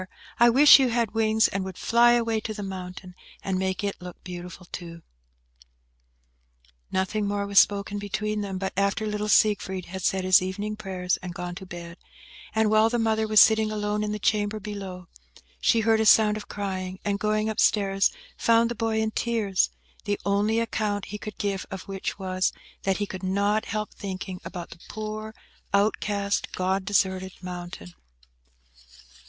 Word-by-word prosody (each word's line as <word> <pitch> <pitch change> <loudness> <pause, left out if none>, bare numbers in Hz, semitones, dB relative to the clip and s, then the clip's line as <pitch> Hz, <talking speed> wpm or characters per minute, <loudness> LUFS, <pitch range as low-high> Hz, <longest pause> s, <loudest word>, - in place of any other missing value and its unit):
I 240 0 +7
wish 280 +4 +8
you 260 -2 +3
had 235 -2 0
wings, 220 0 +3
and 195 - -3
would 190 -1 -7
fly 240 +1 +4
away 230 -2 +1
to 215 0 -5
the 205 - -5
mountain, 185 -1 -7 0.3
and 190 -1 -1
make 190 +1 -2
it 200 -2 -3
look 180 -1 -10
beautiful, 180 0 -8
too!" 170 -1 -8 1.9
Nothing 200 +2 0
more 200 0 -1
was 200 0 +5
spoken 200 0 +2
between 210 +1 -2
them, 195 -2 -4
but 190 0 -3
after 200 +2 0
little 210 0 -2
Siegfried 195 -4 +2
had 190 +1 -7
said 190 +1 0
his 185 -1 +6
evening 200 +3 -3
prayers, 185 -3 -2
and 180 -1 -8
gone 180 0 -5
to 190 +1 -9
bed, 170 -1 -9 0.6
and 220 -1 +3
while 215 +1 +5
the 240 - 0
mother 220 -1 +1
was 215 -1 +5
sitting 220 -1 +5
alone 210 0 -1
in 210 - -2
the 210 - -2
chamber 210 0 0
below, 195 -3 -7 0.5
she 230 - +3
heard 220 0 +3
a 220 - +2
sound 210 0 +6
of 215 - -7
crying; 190 -2 -4
and, 200 -1 0
going 215 +1 0
up 220 - -3
stairs, 195 -2 +3 0.3
found 230 0 +3
the - - 0
boy 225 -1 -1
in 220 0 0
tears, 215 -5 0 0.4
the 205 -1 -1
only 205 +3 +2
account 210 -3 -1
he 210 - -4
could 215 -1 -8
give 200 -2 -2
of 190 -1 -6
which 195 -1 -5
was, 185 -1 0 0.3
that 195 -1 0
he 205 - -1
could 185 -2 -7
not 200 +3 +1
help 215 -1 -4
thinking 190 -1 -6
about 175 -2 -7
the 170 - -12
poor 215 0 -6 0.4
outcast, 200 0 0
God 190 +1 -1
deserted 190 -1 0
mountain. 175 - -7
205 Hz, 175 wpm, -26 LUFS, 190-215 Hz, 1.9 s, wish